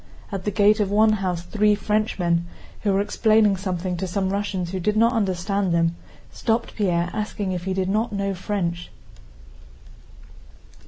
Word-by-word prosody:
At 195 -2 -4
the - - +1
gate 210 +1 +4
of 205 -2 +1
one 215 +2 +4
house 185 -4 -2
three 210 +2 +2
Frenchmen, 195 -5 0 0.3
who 205 - +1
were 195 +1 +2
explaining 215 -1 +3
something 185 -1 -3
to 190 - -3
some 190 +1 -1
Russians 195 -3 -2
who 190 - -3
did 210 +4 0
not 230 +2 +4
understand 195 -2 0
them, 165 0 +2 0.4
stopped 230 0 -1
Pierre 175 -4 0
asking 210 -2 -3
if 180 -1 -4
he 190 - -1
did 190 -1 0
not 215 +4 0
know 200 -1 -1
French. 175 -3 -3
195 Hz, 160 wpm, -23 LUFS, 180-210 Hz, 0.4 s, gate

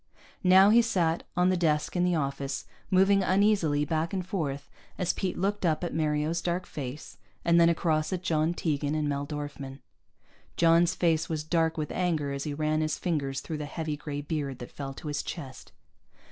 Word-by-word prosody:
Now 190 +2 +7
he 235 +2 +7
sat 175 -8 0
on 180 +1 +4
the 185 - +2
desk 155 -3 0
in 175 - +2
the 180 -1 +2
office, 140 -2 -2 0.2
moving 195 +1 +4
uneasily 185 -6 +2
back 160 +2 -1
and 185 -2 -2
forth 145 -7 -3 0.3
as 180 -1 0
Pete 185 -2 -3
looked 200 +2 -1
up 165 -1 +1
at 175 - -3
Mario's 155 +1 0
dark 180 +1 -1
face, 140 -2 -7 0.3
and 170 0 +5
then 170 - +6
across 155 -2 +1
at 185 -1 -3
John 165 -1 +1
Tegan 150 -3 -1
and 155 -1 0
Mel 140 0 -2
Dorfman. 145 -2 -6 0.8
John's 170 +1 +4
face 165 -2 +1
was 155 -2 -2
dark 160 0 +1
with 150 -2 -3
anger 160 -6 0
as 140 +1 -4
he 150 - -3
ran 155 +1 0
his 155 -1 -1
fingers 140 -6 -2
through 155 -2 -5
the 150 - -3
heavy 155 +1 -3
gray 145 -1 -5
beard 145 -3 -3
that 120 - -9
fell 135 -1 -6
to 155 - -8
his 145 0 -1
chest. 135 -6 -8
160 Hz, 190 wpm, -28 LUFS, 145-175 Hz, 0.8 s, Now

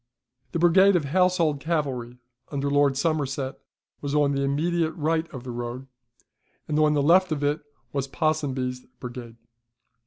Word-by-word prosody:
The - - 0
brigade 185 +4 +5
of 165 -5 +1
household 170 -2 +2
cavalry 135 -7 -2 0.3
under 140 -1 -1
Lord 145 -1 +3
Somerset 140 -3 -1 0.4
was 145 0 -2
on 145 -1 +3
the 140 -1 0
immediate 160 +4 0
right 160 0 -1
of 130 -4 -8
the 125 - -6
road, 120 +2 -5 0.8
and 150 -1 0
on 150 -1 +4
the 145 - +2
left 180 +4 +5
of 145 -2 -1
it 145 +2 +1 0.3
was 140 -1 -1
Ponsonby's 135 -5 -1 0.2
brigade. 120 -2 -8
145 Hz, 150 wpm, -25 LUFS, 135-160 Hz, 0.8 s, brigade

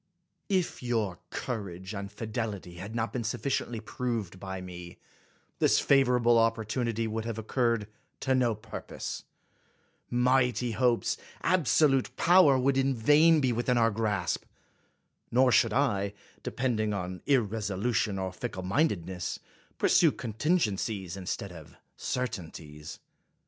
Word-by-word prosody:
If 185 -3 0
your 110 -8 -1
courage 95 -4 -5
and 100 -1 -5
fidelity 105 -5 -5
had 100 +6 -7
not 115 0 -1
been 125 - -2
suf 110 - -3
ficiently 120 -4 -2
proved 115 -8 -3
by 95 0 -5
me, 90 -1 -9 0.6
this - - +4
favorable 125 -4 +4
oppor 115 -1 +2
tunity 115 0 -1
would 110 0 -3
have 115 -2 -3
occurred 115 -1 0 0.3
to 135 - +1
no 125 -4 +2
purpose; 105 - -7 0.8
mighty 125 -1 +2
hopes, 120 +1 +1 0.3
absolute 150 -5 +3
power, 170 -6 +6
would 135 +1 +2
in 135 0 +2
vain 150 +7 +5
be 130 -3 +2
within 120 +2 +1
our 115 -1 +4
grasp; 105 -4 -1 0.9
nor 125 +1 +4
should 115 -1 +4
I, 105 -6 +1 0.3
depending 110 -5 -1
on 90 -1 -4
irresolution 110 -3 +1
or 95 -1 -2
ficklemindedness, 95 - -2 0.4
pursue - - +5
contin 120 - 0
gencies 100 - -1
instead 95 0 -4
of 80 -4 -12 0.2
certainties. 80 -10 -5
115 Hz, 125 wpm, -29 LUFS, 100-125 Hz, 0.9 s, power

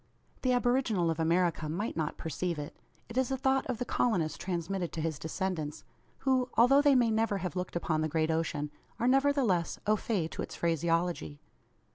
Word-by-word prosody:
The 255 - +2
aboriginal 245 -8 +2
of 165 - -4
America 165 -1 +1
might 195 +8 -2
not 160 -1 -2
perceive 170 +2 -3
it. 145 0 -6 0.3
It 240 +2 -1
is 260 - +1
a 265 - -1
thought 270 0 +1
of 255 -3 -2
the 245 - -3
colonist 185 -11 0
transmitted 180 0 -2
to - - -4
his 160 -3 -2
descendants; 160 -2 -3 0.4
who, 260 -2 +2
although 270 +4 +6
they 290 -2 +5
may 240 -3 +4
never 220 -2 +1
have 180 -5 -4
looked 180 -1 -4
upon 160 -2 0
the 155 - 0
great 160 +1 +1
ocean, 150 -2 -1 0.3
are 240 - +1
nevertheless 265 - +2
au 210 +1 +4
fait 195 -6 -1
to - - -4
its - - -6
phraseology. 165 - 0
180 Hz, 185 wpm, -31 LUFS, 160-245 Hz, 0.4 s, although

